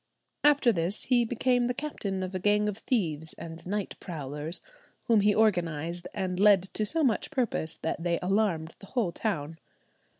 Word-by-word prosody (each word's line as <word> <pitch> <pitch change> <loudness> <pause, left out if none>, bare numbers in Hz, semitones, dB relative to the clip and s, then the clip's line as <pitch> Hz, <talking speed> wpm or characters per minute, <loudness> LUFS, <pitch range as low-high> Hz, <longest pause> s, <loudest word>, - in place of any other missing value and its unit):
After 285 -4 +5
this 180 0 -1
he 245 -2 +3
became 245 +1 +1
the 245 - -1
captain 200 -11 -3
of 185 +1 -5
a 185 - -2
gang 210 +2 +2
of 210 0 -3
thieves 160 - -1
and 165 0 -8
night 205 0 -2
prowlers, 150 -1 -5 0.4
whom 230 -2 +4
he 205 0 +3
organized 175 -5 +1
and 185 -2 -3
led 200 -2 +6
to 215 - 0
so 325 +5 +1
much 240 -6 +1
purpose 220 - 0
that 160 - -3
they 170 0 +1
alarmed 180 -4 0
the 195 - -13
whole 225 -7 0
town. 165 -6 -3
195 Hz, 170 wpm, -28 LUFS, 170-220 Hz, 0.4 s, led